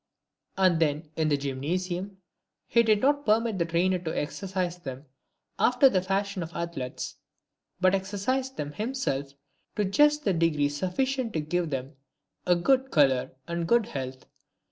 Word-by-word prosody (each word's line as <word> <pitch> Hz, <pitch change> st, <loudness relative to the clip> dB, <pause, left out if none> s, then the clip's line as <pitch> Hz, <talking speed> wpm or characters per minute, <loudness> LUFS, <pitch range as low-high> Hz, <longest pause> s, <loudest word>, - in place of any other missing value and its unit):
And 185 Hz, -3 st, +4 dB
then 155 Hz, 0 st, 0 dB
in 160 Hz, -1 st, +1 dB
the 145 Hz, -, +2 dB
Gymnasium 175 Hz, +8 st, -3 dB, 0.5 s
he 235 Hz, -, +4 dB
did 215 Hz, -2 st, +3 dB
not 285 Hz, +2 st, +2 dB
permit 220 Hz, -2 st, +2 dB
the 170 Hz, -, +2 dB
trainer 175 Hz, +2 st, +1 dB
to 170 Hz, -2 st, -5 dB
exer 185 Hz, +6 st, -4 dB
cise 180 Hz, -2 st, -2 dB
them 135 Hz, -1 st, -7 dB, 0.5 s
after 250 Hz, +2 st, +5 dB
the 185 Hz, -6 st, +1 dB
fashion 195 Hz, 0 st, -1 dB
of 165 Hz, 0 st, -5 dB
athletes, 165 Hz, -7 st, -4 dB, 0.6 s
but 185 Hz, 0 st, +4 dB
exercised 205 Hz, +8 st, -1 dB
them 145 Hz, 0 st, -3 dB
him 225 Hz, -, -4 dB
self 140 Hz, -, -2 dB, 0.4 s
to 210 Hz, -, +1 dB
just 295 Hz, +9 st, +3 dB
the 195 Hz, -, +3 dB
degree 160 Hz, -4 st, +2 dB
sufficient 230 Hz, -, -1 dB
to 160 Hz, -, 0 dB
give 170 Hz, +2 st, -1 dB
them 135 Hz, +1 st, -5 dB, 0.5 s
a 180 Hz, -, +5 dB
good 265 Hz, +9 st, +2 dB
colour 135 Hz, -, +3 dB
and 170 Hz, 0 st, -2 dB
good 235 Hz, +2 st, +4 dB
health. 130 Hz, -, -6 dB
180 Hz, 160 wpm, -27 LUFS, 150-215 Hz, 0.6 s, after